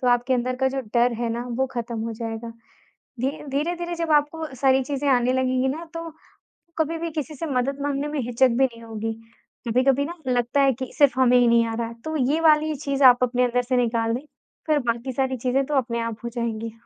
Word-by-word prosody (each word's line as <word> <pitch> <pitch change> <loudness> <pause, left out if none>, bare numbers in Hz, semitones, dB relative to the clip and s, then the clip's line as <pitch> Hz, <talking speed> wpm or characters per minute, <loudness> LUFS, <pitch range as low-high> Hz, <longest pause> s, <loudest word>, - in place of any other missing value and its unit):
तो 250 - +1
आपके 245 +2 +2
अंदर 250 +1 -1
का 265 +1 +2
जो 270 0 -3
डर 240 0 +4
है 235 - 0
ना 235 +1 -3
वो 265 - +2
खत्म 235 -1 -4
हो 230 +1 -3
जाएगा। 225 +1 -5 0.7
धी 260 - +2 0.2
धीरे-धीरे 345 +5 -2
जब 330 -2 -2
आपको 300 +2 +1
सारी 265 0 +3
चीज़ें 285 +1 -3
आने 250 -1 +3
लगेंगी 260 0 +1
ना 320 +5 -4
तो 330 0 -5 0.7
कभी 320 +1 0
भी 335 - -3
किसी 305 0 -4
से 310 - -4
मदद 275 0 -1
माँगने 285 0 -1
में 295 0 -3
हिचक 245 +2 +2
भी 240 +3 +2
नहीं 230 -3 -7
होगी। 225 0 -4 0.5
कभी-कभी 260 +4 +2
ना 335 - -5
लगता 245 +2 +1
है 270 -1 +4
कि 260 +1 -6
सिर्फ 280 -3 +4
हमें 250 -1 +5
ही 245 - +4
नहीं 235 0 +4
आ 225 - -3
रहा 230 0 -2
है 235 - -8
तो 315 0 -3 0.2
ये 315 - +1
वाली 310 -1 +4
चीज़ 280 -1 -2
आप 250 -1 +7
अपने 250 0 +1
अंदर 245 0 +1
से 250 +1 0
निकाल 230 -2 +1
दें। 255 +5 -4 0.4
फ़िर 305 -1 +3
बाकी 235 +3 -1
सारी 260 0 -1
चीज़ें 255 +3 0
तो 295 - -2
अपने 235 -3 0
आप 230 -1 -3
हो - - -2
जाएँगी। 230 -1 -3
255 Hz, 230 wpm, -24 LUFS, 235-285 Hz, 0.7 s, आप